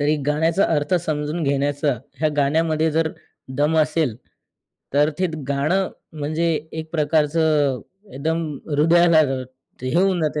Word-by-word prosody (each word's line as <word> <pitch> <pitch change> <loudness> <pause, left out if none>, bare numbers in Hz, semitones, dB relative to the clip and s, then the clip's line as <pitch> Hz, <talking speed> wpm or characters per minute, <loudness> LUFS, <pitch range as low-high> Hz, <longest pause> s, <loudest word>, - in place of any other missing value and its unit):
तरी 150 +2 +2
गाण्याचा 160 +5 +2
अर्थ 145 +4 0
समजून 150 +2 -2
घेण्याचा 145 +1 +1 0.3
ह्या 155 - +3
गाण्यामध्ये 155 +2 +2
जर 160 +1 +1 0.5
दम 150 +2 +2
असेल, 155 -5 +1 0.8
तर 150 +2 +4
ते 185 - +2 0.2
गाणं 155 +8 +1 0.2
म्हणजे 155 +2 -2 0.3
एक 160 0 -6
प्रकारचं 150 -3 +2 0.3
एकदम 160 +4 -2 0.2
हृदयाला 165 +3 +4 0.6
हे 130 +1 -2
होऊन 185 0 +3
जातं, 150 -1 -1
155 Hz, 120 wpm, -22 LUFS, 145-165 Hz, 0.8 s, तर